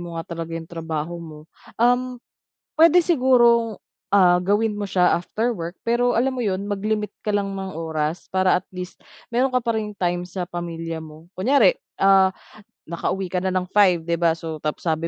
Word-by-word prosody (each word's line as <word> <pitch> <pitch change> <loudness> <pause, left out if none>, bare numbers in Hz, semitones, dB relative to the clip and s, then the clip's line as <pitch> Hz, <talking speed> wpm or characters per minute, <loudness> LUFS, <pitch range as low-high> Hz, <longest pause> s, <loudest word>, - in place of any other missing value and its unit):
mo 170 -1 -7
nga 165 - -4
talaga 165 0 -5
'yong 165 0 -9
trabaho 165 +1 -4
mo, 155 -2 -10 0.4
um, 245 +2 +2 0.6
puwede 330 +2 +6
sigurong, 240 - +3 0.3
ah, 180 -3 +5
gawin 210 +3 +1
mo 205 -1 -5
siya 180 -1 +3
after 220 +7 -2
work 170 -1 -6
pero 240 0 +2
alam 260 +2 +1
mo 250 - -3
'yon, 200 -1 -2
mag-limit 210 0 -2
ka 210 - -2
lang 200 -1 -1
ng 190 -1 -5
oras 160 0 -3
para 185 -1 +3
at 185 - -15
least, 180 0 -7 0.3
meron 255 +2 +1
ka 250 - +2
pa 230 - -1
ring 210 -1 -5
time 175 -2 -1
sa 180 0 -6
pamilya 165 -1 -5
mo. 160 +2 -12
Kunyari, 225 0 +4 0.2
ah, 190 -1 +5 0.6
nakauwi 185 +2 -2
ka 180 - -2
na 185 0 -2
ng 185 -1 -1
5, 185 -5 +4
'di 170 0 -1
ba, 165 -1 +3
so 165 -1 -6
tapos 150 0 -4
sabi 165 0 -1
185 Hz, 185 wpm, -22 LUFS, 170-220 Hz, 0.6 s, puwede